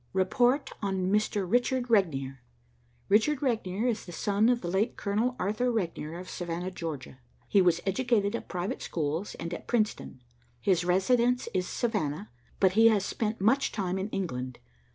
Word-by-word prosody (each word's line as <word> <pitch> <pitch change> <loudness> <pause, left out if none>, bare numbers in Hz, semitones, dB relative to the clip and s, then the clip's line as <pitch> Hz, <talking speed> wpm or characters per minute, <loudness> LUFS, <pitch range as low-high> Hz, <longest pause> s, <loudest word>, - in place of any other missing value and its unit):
"Report 245 +9 +2
on 190 -2 -1
Mr. 210 -2 +1
Richard 245 +4 +1
Regnier. 135 - +1 0.7
Richard 260 +8 +3
Regnier 220 -4 -1
is 230 -4 0
the 175 - -9
son 205 +5 +2
of 245 -1 +2
the - - -4
late 195 +6 0
Colonel 215 +5 0
Arthur 215 +6 0
Regnier 170 -7 -3
of 180 - -9
Savannah, 175 +1 -4
Georgia. 155 -7 -6 0.3
He 200 - +4
was 175 -2 +3
educated 210 0 +1
at - - -6
private 180 +1 -3
schools, 160 +4 -3
and 170 +1 -5
at - - -7
Princeton. 215 - -1 0.4
His 180 +6 +2
residence 235 +8 +2
is 180 -1 0
Savannah, 205 - -2 0.3
but 190 -2 +5
he 225 +4 +6
has 210 -3 +3
spent 220 0 -2
much 245 +8 +2
time 190 -2 -2
in 195 +3 -3
England. 130 - -4
195 Hz, 160 wpm, -29 LUFS, 175-230 Hz, 0.7 s, he